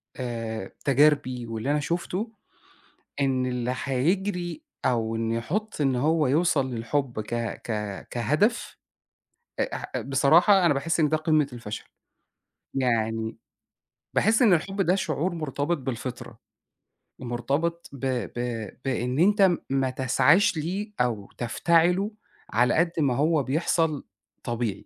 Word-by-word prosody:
آآ، 115 -5 -4
تجاربي 140 -3 +3
واللي 115 +5 -2
أنا 150 - +2
شُفته، 180 +8 -2 0.9
إن 130 -2 +1
اللي 125 0 -1
هيجري 175 - -1 0.2
أو 115 -2 +1
إن 115 0 -1
يحُط 180 - -3
إن 135 -3 +2
هو 155 +4 +2
يوصل 140 -2 +2
للحُب 120 0 -2
ك 110 +2 -5 0.3
ك 105 -3 -4
كهدف، 155 - 0 0.8
أ - - -1
ح - - -8
بصراحة 160 - +4
أنا 145 - +4
باحس 165 +5 0
إن 150 - +4
ده 155 - +2
قِمّة 155 -2 +2
الفشل. 115 -3 -6 0.9
يعني 115 -3 0 0.8
باحس 220 +3 +3
إن 220 -6 +6
الحُب 195 +4 0
ده 180 0 +3
شعور 175 -1 -1
مرتبط 155 +1 -1
بالفطرة، 130 -2 -6 0.8
مرتبط 140 +8 -2
ب 140 - -9 0.4
ب 115 -3 -3 0.2
بإن 125 0 -1
أنت 205 +4 +4
م 185 -3 +5
ما 135 -1 +1
تسعاش 135 +9 +3
ليه 190 +7 -3
أو 110 -5 -1
تفتعله 170 - +2 0.4
على 120 +3 +3
قد 170 +1 +2
ما 135 -5 +2
هو 150 +2 +2
بيحصل 155 +2 0 0.4
طبيعي. 115 -4 -3
140 Hz, 125 wpm, -26 LUFS, 120-170 Hz, 0.9 s, إن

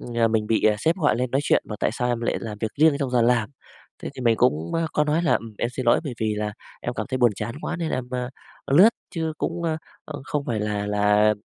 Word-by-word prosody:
ừm, 115 -2 0
mình 110 -1 +1
bị, 110 - +1
ờ, 105 -1 +5
sếp 165 - +1
gọi 150 -9 +2
lên 125 0 -1
nói 135 - +1
chuyện, - - +3
bảo: 105 - -5
"Tại - - +2
sao 125 +1 -1
em 120 -1 -1
lại 120 - 0
làm 105 -2 -6
việc 110 - -1
riêng 155 -2 +6
trong 135 -3 -2
giờ 120 -2 +3
làm?" 115 -2 +2 0.5
Thế - - -4
thì - - -8
mình 115 -2 +3
cũng, 85 - +1
á, 165 - +1
có 150 - +2
nói 155 +3 +1
là - - +2
"Ừm, 115 -2 -2
em 120 - 0
xin 130 -1 -4
lỗi, 120 - +5
bởi 130 -4 -4
vì 110 -1 0
là 105 0 -2 0.3
em 120 - -4
cảm - - -3
thấy 130 0 -2
buồn 120 -2 +5
chán 110 +3 -4
quá 175 - -3
nên 165 -2 -3
em, 130 -1 -2
a, 125 0 -3 0.4
lướt, 185 +9 +8 0.3
chứ 160 -1 -1
cũng, 170 +1 -2
ơ, 160 -2 0 0.3
ơ, 150 -3 -7
không 145 -1 -2
phải 110 -3 -2
là 105 -1 -2
là" 105 +1 +3
120 Hz, 275 wpm, -24 LUFS, 110-145 Hz, 0.5 s, lướt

